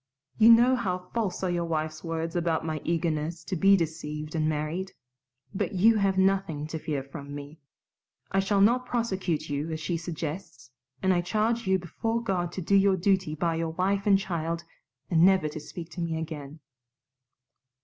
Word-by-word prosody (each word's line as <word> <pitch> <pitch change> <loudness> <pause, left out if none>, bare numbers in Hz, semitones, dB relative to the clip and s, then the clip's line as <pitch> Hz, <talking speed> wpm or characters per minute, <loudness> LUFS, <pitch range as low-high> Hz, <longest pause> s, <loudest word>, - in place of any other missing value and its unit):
You 220 +1 +8
know 240 +3 +6
how 185 -6 -3
false 215 -5 -2
are 185 - +1
your 175 -1 -1
wife's 155 -1 -3
words 165 0 -3
about 165 -2 0
my 155 -2 -3
eagerness 165 0 -1
to 185 - -3
be 195 +3 +5
deceived 155 -2 -4
and 155 -2 +1
married. 155 +5 -3 0.6
But 190 - -2
you 215 +4 +5
have 195 -2 +1
nothing 190 -6 +1
to 160 - -4
fear 150 -4 -3
from 140 +1 -9
me. 145 +2 -9 0.7
I 195 - +2
shall 195 +1 +2
not 245 +5 +4
prosecute 190 -9 -1
you 145 +2 -2
as 160 -1 -3
she 165 +2 -2
suggests, 160 -4 -6 0.3
and 190 0 +4
I 175 - +2
charge 220 +5 0
you 190 0 +4
before 225 +6 -2
God 185 -6 -1
to 185 - -4
do 200 - -1
your 195 -1 +5
duty 185 -4 +1
by 165 +2 0
your 165 0 -1
wife 195 +3 0
and 200 -1 +6
child 170 -3 -3 0.5
and 165 -1 +5
never 190 -4 +5
to 155 +1 -6
speak 170 +2 -9
to 175 - -6
me 165 -1 -1
again." 155 -2 -6
170 Hz, 180 wpm, -27 LUFS, 155-195 Hz, 0.7 s, You